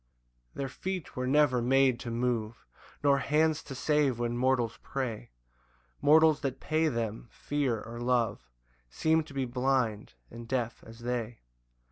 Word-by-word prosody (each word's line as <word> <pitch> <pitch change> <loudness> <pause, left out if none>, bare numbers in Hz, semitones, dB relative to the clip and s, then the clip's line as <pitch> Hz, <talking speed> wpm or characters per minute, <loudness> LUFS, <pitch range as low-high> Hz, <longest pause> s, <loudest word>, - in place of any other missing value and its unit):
6 - - -34
Their 135 - -2
feet 185 +4 -5
were 125 0 -2
never 135 -3 +3
made 130 0 +3
to 120 - -6
move, 115 -1 -2 0.4
Nor 140 -1 +4
hands 155 +2 +2
to 135 - -7
save 145 -2 +1
when 120 0 -1
mortals 125 -2 +1
pray; 125 -6 -4 0.7
Mortals 155 0 +5
that 135 -2 -3
pay 160 +1 +1
them 115 -4 -3
fear 140 -6 -1
or 115 +1 -8
love 120 - 0 0.4
Seem 160 - +2
to 150 - -14
be 135 -1 0
blind 125 -3 -1 0.2
and 115 0 -9
deaf 120 -2 -2
as 115 +1 -12
they. 120 -1 -3
125 Hz, 150 wpm, -30 LUFS, 120-140 Hz, 0.7 s, Mortals